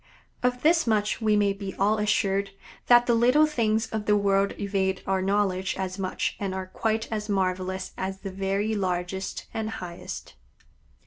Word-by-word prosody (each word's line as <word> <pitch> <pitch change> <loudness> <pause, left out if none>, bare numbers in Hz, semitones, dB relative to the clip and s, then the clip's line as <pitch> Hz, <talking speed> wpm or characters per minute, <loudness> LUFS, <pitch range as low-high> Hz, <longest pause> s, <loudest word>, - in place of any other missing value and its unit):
Of 250 0 0
this 325 -2 +4
much 215 0 +1
we 215 -1 +3
may 205 -1 +3
be 195 -1 -6
all 210 +2 +2
assured, 200 -2 +1 0.4
that 240 0 +7
the 240 - +3
little 250 +6 +5
things 225 -7 +1
of 215 -2 -3
the 210 0 +5
world 200 0 +2
evade 195 -2 -1
our 190 -1 +1
knowledge 190 -1 0
as 190 0 -4
much 185 -1 -2
and 195 -2 -2
are 190 0 -3
quite 220 +4 -1
as 215 -1 -3
marvelous 185 -1 -1
as 190 0 -4
the 195 - -5
very 195 +3 -1
largest 185 -1 -2
and 220 -1 -2
highest. 175 -5 -7
200 Hz, 170 wpm, -26 LUFS, 190-220 Hz, 0.4 s, that